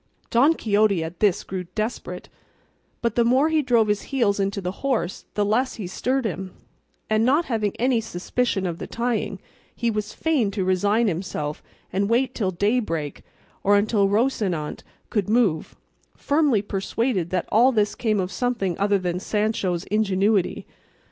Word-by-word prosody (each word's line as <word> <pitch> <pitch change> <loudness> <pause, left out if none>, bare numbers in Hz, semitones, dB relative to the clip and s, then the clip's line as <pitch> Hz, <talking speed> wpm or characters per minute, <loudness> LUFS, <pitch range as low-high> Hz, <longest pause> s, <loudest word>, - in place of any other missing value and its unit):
Don 275 +8 +5
Quixote 205 - +2
at 160 +2 -7
this 205 -4 +2
grew 185 -1 -5
desperate, 215 +2 -4 0.8
but 235 -2 +1
the 235 - +3
more 260 +6 +3
he 315 -1 +2
drove 235 -5 +3
his 210 -1 +1
heels 225 -7 +1
into 195 0 0
the 180 -1 -3
horse, 230 -10 -1
the 205 - +2
less 250 +6 +1
he 215 - -6
stirred 255 +8 -1
him; 190 -2 -4 0.5
and 215 0 +2
not 285 +8 +3
having 215 -5 -1
any 245 -1 +2
suspicion 210 +1 -1
of 170 -1 -3
the - - -5
tying, 235 -4 -2 0.4
he 235 -1 0
was 210 -1 -3
fain 290 -9 +1
to 195 -2 -2
resign 205 +5 +2
himself 160 -5 -3 0.3
and 200 +2 +1
wait 250 +2 +2
till 200 -5 -1
daybreak 185 - -1 0.4
or 205 +1 +5
until 205 -1 +2
Rocinante 200 - 0 0.3
could 210 -4 0
move, 210 -9 +1 0.4
firmly 285 -8 +2
persuaded 195 -1 -1
that 180 -1 -1
all 240 +5 +5
this 210 -3 +1
came 215 -3 0
of 185 0 -2
something 235 -8 -1
other 200 0 +3
than 180 -1 -2
Sancho's 205 -4 -1
ingenuity. 200 -1 +1
210 Hz, 160 wpm, -24 LUFS, 190-235 Hz, 0.8 s, Don